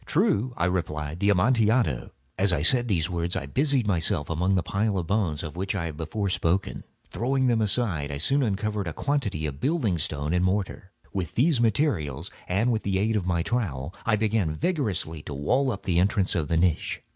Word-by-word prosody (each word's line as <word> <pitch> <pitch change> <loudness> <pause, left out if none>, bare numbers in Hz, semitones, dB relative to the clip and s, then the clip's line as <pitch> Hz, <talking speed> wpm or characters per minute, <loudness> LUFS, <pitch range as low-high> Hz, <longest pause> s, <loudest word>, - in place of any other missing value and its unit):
"True," 155 - +2
I 85 - +1
replied; 80 -3 -2
"the 100 +1 +2
Amontillado." 105 - +2 0.3
As 100 0 +2
I 80 -4 0
said 120 +6 +4
these 85 -7 +1
words 85 0 -2
I - - -2
busied 135 - +1
myself 85 -4 +1
among 90 +4 +1
the 90 - +1
pile 100 +2 0
of 90 - -2
bones 90 -6 0
of 80 -1 -6
which 95 +3 -2
I 90 -4 -2
have 80 -3 -6
before 85 +6 -3
spoken. 90 +1 0 0.3
Throwing 130 +2 0
them 120 -3 +2
aside, 100 -9 0
I 70 - -4
soon 135 - +2
uncovered 105 -3 -1
a 85 - -3
quantity 125 - -1
of 70 -2 -5
building 130 - 0
stone 75 +2 -2
and 90 0 +2
mortar. 95 0 -1 0.2
With 90 -5 -3
these 135 0 +3
materials 95 - 0 0.2
and 100 +7 +1
with 110 -2 0
the 95 -1 -1
aid 110 +3 +1
of 95 -4 -1
my 85 -2 +1
trowel, 85 - -2
I 115 - +2
began 105 -7 0
vigorously 95 - -2
to 75 - -7
wall 130 - +1
up 100 - -6
the 90 -3 +1
entrance 95 +1 +1
of 80 -4 -1
the 80 - +1
niche. 85 -1 0
95 Hz, 205 wpm, -26 LUFS, 80-115 Hz, 0.3 s, said